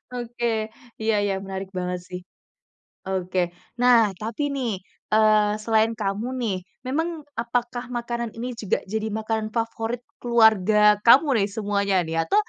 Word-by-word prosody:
Oke, 235 -2 -2 0.3
iya 220 0 +2
iya 200 - 0
menarik 190 0 -5
banget 180 0 -2
sih. 180 - -6 0.9
Oke, 185 -2 -1 0.3
nah 240 -3 +6
tapi 230 +7 -2
nih, 240 -9 -2 0.3
eee, 215 -1 +4
selain 220 0 +3
kamu 210 +1 -2
nih, 210 -6 0 0.3
memang 320 +3 -2 0.2
apakah 240 +1 -2
makanan 235 -1 -3
ini 245 +2 -4
juga 225 -5 -2
jadi 220 +2 -3
makanan 220 0 -2
favorit 230 +1 -2 0.2
keluarga 215 -3 +4
kamu 265 +6 +8
nih 200 - +2
semuanya 200 -1 -1
nih? 165 0 -2
Atau, - - +1
220 Hz, 135 wpm, -24 LUFS, 200-235 Hz, 0.9 s, kamu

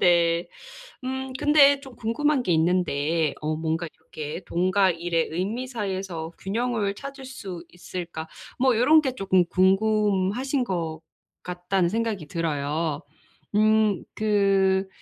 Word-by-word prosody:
네. 170 -1 +3 0.6
음 265 0 -4
근데 285 -1 +5
좀 265 -3 -13
궁금한 270 +5 +1
게 180 - +1
있는데 160 -2 +1
어 155 0 -1
뭔가 160 +1 -2
이렇게 155 +3 -7
"돈과 185 +2 +2
일의 170 -1 -1
의미 200 +10 -2
사이에서 190 -8 -4
균형을 215 0 -1
찾을 275 +3 -9
수 195 -10 -8
있을까?" 175 -2 -7 0.3
뭐 255 -2 +3
'요런 290 +7 +6
게 265 -3 -2
조금 190 -5 +2
궁금하신 205 +6 +2
것 165 -6 -3 0.4
같다.'는 180 0 0
생각이 220 -6 -2
들어요. 155 -1 -2 0.5
음 215 -2 +3
그 195 -2 +2
190 Hz, 235 characters per minute, -25 LUFS, 170-230 Hz, 0.6 s, 요런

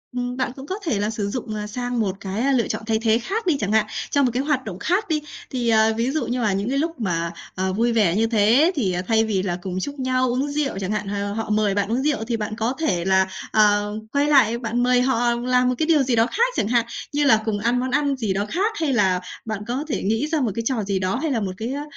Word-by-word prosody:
ừm, 245 0 -3
bạn 255 -1 -1
cũng 270 - -9
có 370 - -3
thể 235 - 0
là 210 - 0
sử 215 -2 -3
dụng, 235 0 -4
ơ, 210 0 -4
sang 245 +2 -3
một 200 -3 0
cái 220 +8 -1
lựa 240 -3 +2
chọn - - -3
thay 220 -1 +1
thế 225 0 +2
khác 420 - -3
đi 310 - +3
chẳng 200 -1 -1
hạn, 220 -1 +3 0.3
trong 285 -1 +3
một 250 - +1
cái 255 +2 0
hoạt 285 -3 0
động 190 -4 -6
khác 370 - 0
đi. 310 -2 +1 0.3
Thì, 245 -3 -1
ờ, 220 0 +4
ví 240 +3 0
dụ 310 - -1
như 245 +1 -1
mà 210 -4 +1
những 200 +4 -1
cái 275 - 0
lúc 325 -1 -2
mà, 170 -5 -1 0.2
ờ, 190 0 -1
vui 235 +3 +1
vẻ 205 -7 +3
như 225 +2 +2
thế 230 - +4
thì 195 - 0
thay 225 0 +3
vì 210 -4 0
là 175 -3 -2
cùng 185 0 -4
chúc 285 +8 -5
nhau 255 0 +1
uống 255 +4 0
rượu 285 -7 -2
chẳng 195 0 -3
hạn, 210 -1 -2
ờ, 200 0 -2
họ 225 0 -4
mời 210 -2 +2
bạn 205 +1 0
uống 245 +3 +1
rượu 290 -6 0
thì 235 -2 -1
bạn 215 0 -4
có 225 +4 -1
thể 180 - 0
là, 190 0 +3 0.2
ờ, 205 -1 +3 0.2
quay 285 +1 +2
lại 250 -6 +4
bạn 235 0 -1
mời 250 0 +4
họ 245 -2 +2
làm 250 +1 +2
một 250 - 0
cái 315 - +1
điều 310 -4 +4
gì 255 -2 +1
đó 225 0 +4
khác 480 - +1
chẳng - - 0
hạn, 235 0 +2 0.3
như 290 0 +1
là 220 -6 +5
cùng 215 -2 -1
ăn 235 +4 +1
món 255 +1 -2
ăn 285 0 +1
gì 220 -6 -1
đó 200 +2 -1
khác 415 +5 0
hay 305 -4 +1
là 190 -6 +2 0.3
bạn 215 -2 -3
có 255 +4 -2
thể 285 - -2
nghĩ 225 +8 0
ra 310 -1 0
một 235 -5 0
cái 230 - -2
trò 235 -3 0
gì 195 -1 -1
đó, 185 +2 -1
hay 315 - 0
là 245 - +1
một 195 -3 -2
cái, 230 +5 -3
a, 285 - -4
230 Hz, 285 wpm, -22 LUFS, 210-265 Hz, 0.3 s, là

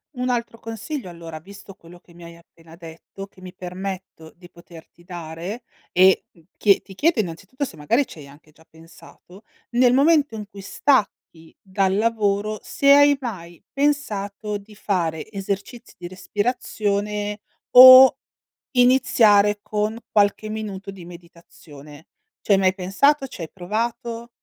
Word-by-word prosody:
Un 250 0 -3
altro 235 -2 -3
consiglio 225 +3 -7
allora, 165 -2 -10
visto 195 +3 -14
quello 175 -1 -17
che 170 - -22
mi 170 - -14
hai 170 0 -12
appena 165 -1 -19
detto, 170 +3 -11
che 190 - -21
mi 185 -1 -11
permetto 185 -3 -8
di 175 0 -17
poterti 170 0 -17
dare, 175 +5 -8 0.3
e, 185 +1 +4
mhmm, 165 - -24
chie 200 -2 +4
ti 195 - -15
chiedo 315 - +1
innanzitutto, 200 - -5
se 255 - -6
magari 230 - 0
ci - - -13
hai 140 - -12
anche 150 +2 -19
già 160 +1 -24
pensato: 165 +4 -18 0.3
nel 245 +1 +3
momento 290 0 +3
in 210 -2 -7
cui 200 -2 -12
stacchi 200 - -2
dal 190 0 -1
lavoro, 215 -1 0
se 280 0 +2
hai 285 0 +6
mai 175 -9 -8
pensato 210 -8 -2
di 205 +1 -16
fare 175 -4 -3
esercizi 200 +4 -6
di 175 - -7
respirazione, 205 0 -3 0.3
o 255 +1 +10 0.6
iniziare 220 -5 +4
con 215 +2 -3
qualche 205 +1 +1
minuto 205 -3 -6
di 190 -3 -12
meditazione. 165 -3 -15 0.3
Ci - - -1
hai 195 - +5
mai 190 -1 +2
pensato? 270 +10 +1
Ci 250 - -12
hai 160 - -7
provato? 230 +5 -4
200 Hz, 145 wpm, -21 LUFS, 175-230 Hz, 0.6 s, o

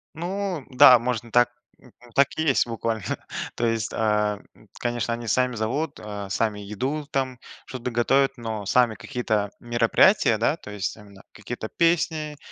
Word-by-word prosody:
Ну 180 -2 -3
да, 125 -1 +8
можно 120 -1 -3
так, 120 +1 +4 0.3
м 125 - -19
м, 120 - -17
так 140 0 +5
и 160 - 0
есть 135 -5 +3
буквально. 115 -2 -3 0.5
То 120 - -1
есть, 115 -2 -1
ам, 105 -2 0 0.3
конечно, 120 -1 -1
они 115 0 -6
сами 125 +1 +1
зовут, 140 +8 -2
а, 100 -2 -7
сами 105 +1 -1
еду 130 +9 -3
там, 130 -2 -1 0.3
что-то 125 -3 -5
готовят, 135 +3 +2
но 110 -3 -5
сами 115 +1 +3
какие-то 110 -2 -2
мероприятия, 120 - +3
да, 120 +7 +1
то 105 - -11
есть 100 -1 -3
именно 100 -2 -15
какие-то 120 -2 -6
песни 155 -2 0
120 Hz, 160 wpm, -24 LUFS, 110-135 Hz, 0.5 s, да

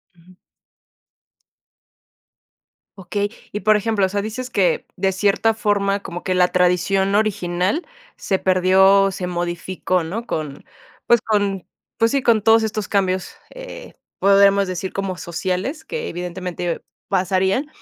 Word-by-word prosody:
Uju. 175 +2 -20 2.6
Okey. 200 +2 -2 0.2
Y 210 - -4
por 215 0 +4
ejemplo, 210 -2 +1
o 190 - -2
sea, 200 +1 -1
dices 245 +4 -5
que 195 -6 +1
de 190 0 +1
cierta 205 +3 +2
forma, 200 -2 0
como 175 -2 -7
que 185 -1 -1
la 180 0 +4
tradición 180 +2 +2
original 200 - 0 0.3
se 190 - -1
perdió, 190 +1 +4
o 195 - +1
se 185 -1 -4
modificó 175 +1 -2
¿no? 205 +9 -5
Con, 150 -8 -5 0.4
pues 235 -2 +5
con, 200 -3 -1 0.3
pues 230 0 +2
sí, 275 -1 +1
con 230 -3 +3
todos 225 +1 +5
estos 215 -2 -3
cambios, 190 -2 0 0.2
eh, - - -10 0.3
podemos 200 0 +5
decir 185 +1 -4
como 195 -1 -3
sociales, 185 - -3
que 475 -1 -4
evidentemente 175 0 -4 0.2
pasarían. 190 - +1
195 Hz, 135 wpm, -20 LUFS, 185-210 Hz, 2.6 s, pues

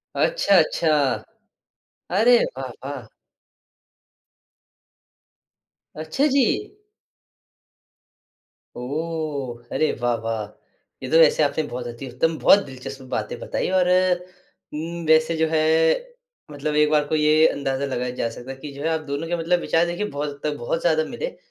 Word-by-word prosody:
अच्छा-अच्छा। 180 - +3 1.3
अरे 240 +2 +6 0.2
वाह-वाह। 135 +1 -7 3.0
अच्छा 160 - -1
जी! 265 -4 +5 2.3
ओह! 140 -3 -4
अरे 155 - +2
वाह-वाह! 115 -3 -1 0.6
ये 130 - -4
तो 160 - +5
वैसे 155 -1 +5
आपने 155 +2 0
बहुत 120 0 -5
अति 120 +3 -7
उत्तम, 160 +6 0
बहुत 200 - +6
दिलचस्प 135 0 -9
बातें 480 - -3
बताईं - - -3
और 185 -1 +3 0.9
उम, 165 +2 -5
वैसे 160 +1 +4
जो 160 0 +2
है 155 -1 +2 0.9
मतलब 150 +1 -3
एक 150 0 +4
बार 150 -1 +3
को 155 - 0
ये 155 +1 +5
अंदाज़ा 135 0 -2
लगाया 125 -2 -3
जा 115 - -1
सकता 125 +3 -9
है 135 - -9
कि 145 +1 -8
जो 140 - -9
है 160 - +1
आप 160 -1 0
दोनों 145 +4 -3
के 175 - -1
मतलब 175 +2 +1
विचार 165 0 +2
देखिये 175 +5 -3
बहुत 145 +1 -3
हद 145 - -10
तक 150 -1 -2
बहुत 140 +8 -2
ज़्यादा 160 -2 +2
मिले - - -5
150 Hz, 135 wpm, -23 LUFS, 135-165 Hz, 3.0 s, अरे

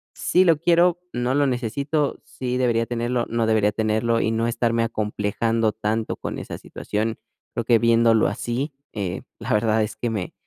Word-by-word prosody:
sí 185 +2 +3
lo 165 -3 +5
quiero, 170 +2 +3
no 120 +2 0
lo 145 0 +3
necesito, 140 +4 -1
sí 125 -1 -4
debería 115 -2 +1
tenerlo, 120 0 -1
no 115 -1 0
debería 110 -2 +3
tenerlo 110 +2 +1
y 110 - +1
no 115 +1 0
estarme 115 -1 +1
acomplejando 110 0 0
tanto 110 +1 -2
con - - -5
esa - - -6
situación. 110 +1 -3 0.3
Creo 115 - -2
que 115 0 +5
viéndolo 115 -1 +4
así, 125 +6 -3 0.2
eh, 95 -5 -3 0.2
la - - -3
verdad 110 +1 +2
es 105 0 -4
que 120 - -2
me, 105 -5 -3
115 Hz, 170 wpm, -23 LUFS, 110-125 Hz, 0.3 s, lo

